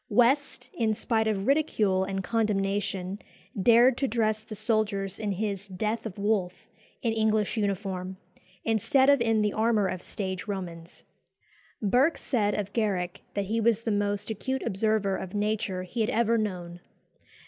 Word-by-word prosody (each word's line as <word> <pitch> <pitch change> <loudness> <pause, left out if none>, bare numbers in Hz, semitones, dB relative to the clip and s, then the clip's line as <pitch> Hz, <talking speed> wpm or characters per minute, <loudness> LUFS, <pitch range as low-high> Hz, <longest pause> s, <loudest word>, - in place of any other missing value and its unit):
West, 250 0 +2
in 220 -2 0
spite 220 0 0
of 200 -2 -1
ridicule 220 -10 +2
and 195 0 -3
condemnation, 200 -2 -1 0.4
dared 240 +4 +6
to 270 - 0
dress 220 -2 0
the 215 0 -9
soldiers 205 -3 0
in 210 -2 -1
his 200 0 -3
"Death 215 +4 -2
of 200 - -9
Wolfe" 200 -3 -1 0.4
in 230 -2 +1
English 220 -1 +1
uniform, 190 -3 -2 0.5
instead 260 +5 +4
of 280 -3 +3
in 225 -2 +2
the 210 - 0
armour 220 -2 +2
of 185 -1 -3
stage 190 -2 -5
Romans. 175 -4 -6 0.8
Burke 255 - +3
said 210 -5 0
of 200 -1 -3
Garrick 190 -6 -1
that 200 -1 0
he 225 +3 -1
was 225 -1 +3
the 230 - -1
most 205 +1 -1
acute 260 +5 -3
observer 200 0 +1
of 190 +1 -6
nature 205 -3 -1
he 225 +6 -4
had 220 - +1
ever 230 0 +2
known. 180 -5 -3
210 Hz, 155 wpm, -27 LUFS, 195-225 Hz, 0.8 s, dared